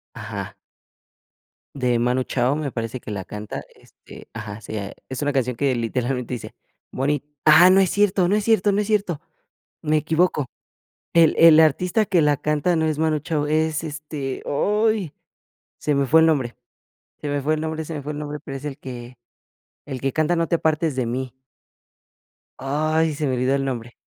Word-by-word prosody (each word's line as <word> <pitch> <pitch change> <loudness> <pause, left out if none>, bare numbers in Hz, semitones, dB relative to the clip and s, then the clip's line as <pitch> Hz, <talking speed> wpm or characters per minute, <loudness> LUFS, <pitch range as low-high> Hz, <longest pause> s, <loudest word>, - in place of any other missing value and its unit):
Ajá. - - -6 1.2
De 125 -3 +1
Manu 125 +2 +1
Chao 130 +3 0
me 150 -3 -3
parece 115 +1 -4
que - - -9
la 100 -3 -4
canta, 105 +1 -6
este, - - -16
ajá, 105 +1 -7
sí, 110 +1 -7
eh, 100 -1 -5
es 130 - -5
una 145 0 +1
canción 125 -2 0
que 135 +1 +1
literalmente 125 +1 -2
dice: 120 - -8 0.4
"Moni" 140 +2 -1 0.2
ah 160 +4 +8
no 190 +1 +6
es 190 - +3
cierto, 205 -3 +2
no 200 - +3
es 210 - -1
cierto, 210 -2 +3
no 200 - +2
es 210 - -1
cierto. 200 -7 0 0.6
Me 155 -1 +2
equivoco. 160 -1 +1 0.7
El 165 -2 +5
el 165 -1 +8
artista 180 +7 +3
que 185 -4 +2
la 150 -1 +3
canta 150 +5 0
no 160 -1 +1
es 155 -1 -1
Manu 155 -1 +1
Chao, 150 0 -2
es 155 +1 0
este, 150 -3 -5
oy, 210 +2 +1 0.7
se 150 - 0
me 140 0 +1
fue 160 +5 +6
el 160 - +5
nombre. 135 -7 0 0.7
Se 145 - -3
me 145 0 -1
fue 150 +3 +1
el 155 - -4
nombre, 160 0 -3
se 165 - -6
me 150 - -4
fue 145 +2 -5
el 150 - -5
nombre, 150 0 -5
pero 135 -1 -6
es 135 - -10
el 140 -2 -5
que 125 -3 -9 0.7
el 130 -3 -6
que 135 -1 -1
canta 155 +2 +1
no 165 0 +1
te 170 - +2
apartes 160 -1 0
de 130 -2 0
mí. 125 +1 -3 1.3
Ay, 155 +3 +1
se 150 +1 -2
me 130 - 0
olvidó 130 +2 +1
el 135 - 0
nombre. 120 -3 -4
150 Hz, 195 wpm, -22 LUFS, 130-160 Hz, 1.3 s, ah